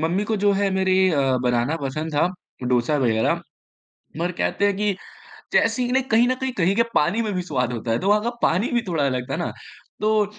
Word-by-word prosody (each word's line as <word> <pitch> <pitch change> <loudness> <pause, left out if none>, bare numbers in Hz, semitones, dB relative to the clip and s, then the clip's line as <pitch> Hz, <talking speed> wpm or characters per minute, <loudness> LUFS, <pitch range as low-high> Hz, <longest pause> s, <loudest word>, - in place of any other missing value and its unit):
Mummy 175 +6 0
को 220 +1 -1
जो 205 0 +2
है 200 0 +1
मेरे 190 0 +1 0.2
अ, 150 -4 +1 0.2
बनाना 125 +5 +1
पसंद 155 +4 -3
था, 145 - +3 0.4
डोसा 125 +4 +1
वग़ैरह। 115 -4 +1 0.8
पर 175 +2 0
कहते 200 - 0
हैं 200 -1 +2
कि 210 0 +1 0.6
जैसे 255 - +2
ही 245 0 -1
ना 265 - +3
कहीं 230 +2 +5
न 255 - +2
कहीं 265 -1 -2
कहीं 185 +2 +3
के 230 - +5
पानी 180 +10 +2
में 215 - -2
भी 180 - -1
स्वाद 125 -8 -1
होता 115 0 -4
है, 115 - +2
तो 195 - -1
वहाँ 210 +1 +4
का 235 - -1
पानी 185 +8 +2
भी 240 -1 +1
थोड़ा 160 -5 0
अलग 125 -2 -2
था - - -1
ना। - - -3 0.5
तो 215 0 +3
180 Hz, 225 wpm, -23 LUFS, 140-210 Hz, 0.8 s, कहीं